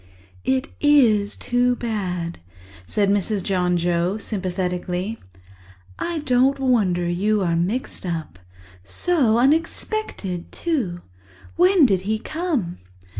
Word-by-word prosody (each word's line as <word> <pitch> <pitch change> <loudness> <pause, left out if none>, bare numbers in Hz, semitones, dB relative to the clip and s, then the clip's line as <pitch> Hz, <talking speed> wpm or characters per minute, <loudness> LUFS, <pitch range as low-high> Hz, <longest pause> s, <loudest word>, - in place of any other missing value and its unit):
"It 265 +3 +1
is 230 -9 +4
too 245 0 +1
bad," 185 -8 -3 0.5
said 205 -1 +1
Mrs. 205 0 0
John 180 -2 +1
Joe 175 +3 0
sympathetically. 185 0 -3 0.8
"I 340 -2 -2
don't 260 +1 +3
wonder 205 -10 +2
you 200 +4 +1
are 170 -2 +1
mixed 190 +10 -2
up. 160 - -4 0.4
So 230 - +2
unexpected, 280 - -1
too! 230 - -2 0.5
When 360 -2 +5
did 195 -7 +2
he 220 - +2
come?" 290 - -3
210 Hz, 105 wpm, -22 LUFS, 180-260 Hz, 0.8 s, When